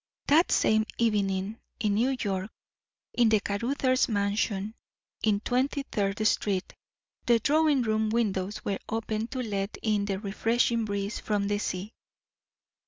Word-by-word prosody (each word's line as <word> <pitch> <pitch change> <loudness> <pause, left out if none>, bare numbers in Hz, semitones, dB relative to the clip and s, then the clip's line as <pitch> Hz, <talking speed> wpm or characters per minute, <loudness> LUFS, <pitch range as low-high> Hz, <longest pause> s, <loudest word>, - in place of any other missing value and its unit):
That 315 +5 +4
same 220 0 +3
evening, 205 -2 0 0.2
in 210 -3 +1
New 255 +5 +1
York, 195 -2 -2 0.6
in 240 -2 +4
the 215 -1 +4
Caruthers 255 +6 0
mansion 205 0 0 0.5
in 205 -2 +2
Twenty 265 +4 0
Third 205 -3 -1
Street, 195 -3 0 0.5
the 240 -1 +6
drawing 295 +2 +3
room 220 -1 +1
windows 210 -2 -1
were 200 -1 -1
open 220 0 -2
to 255 +1 -4
let 200 -2 -3
in 210 -2 +1
the 195 -2 -1
refreshing 225 +3 +1
breeze 200 +1 -3
from 205 -2 -1
the 205 0 0
sea. 195 +2 -4
215 Hz, 135 wpm, -28 LUFS, 200-235 Hz, 0.6 s, the